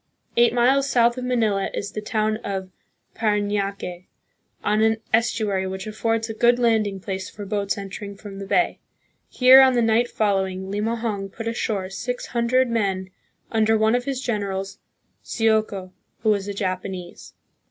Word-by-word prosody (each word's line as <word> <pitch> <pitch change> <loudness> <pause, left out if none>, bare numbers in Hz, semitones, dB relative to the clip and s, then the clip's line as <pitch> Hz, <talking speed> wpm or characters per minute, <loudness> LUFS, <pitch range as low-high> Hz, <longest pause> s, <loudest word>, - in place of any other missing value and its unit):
Eight 235 -1 +5
miles 265 +3 +3
south 235 -2 +3
of 250 - -4
Manila 220 -6 +1
is 200 - -4
the 215 - -5
town 215 0 0
of 190 -4 -5 0.4
Paranaque, 205 -4 -2 0.6
on 210 +1 +2
an 220 0 +3 0.2
estuary 215 -4 +1
which 190 0 -5
affords 225 +1 -1
a 225 - -5
good 240 +2 +4
landing 220 -5 +1
place 190 0 -5
for 205 - -8
boats 200 0 -1
entering 200 +1 -7
from 195 -1 -9
the 195 - -6
bay. 350 - +1 0.5
Here 260 +1 +8
on 260 -1 +6
the 240 - +2
night 225 +2 +2
following, 190 -2 -1
Limahong 210 -1 -2
put 225 +2 -6
ashore 205 -5 -2
six 245 +5 -4
hundred 250 +2 +1
men, 195 -5 -1 0.4
under 220 0 +3
one 220 +1 +3
of 245 0 0
his 275 -2 -2
generals, 200 -5 -3 0.4
Sioco, 215 -4 0 0.3
who 220 - +3
was 200 -1 0
a 205 - -3
Japanese. 185 -2 -5
215 Hz, 155 wpm, -23 LUFS, 195-235 Hz, 0.6 s, Here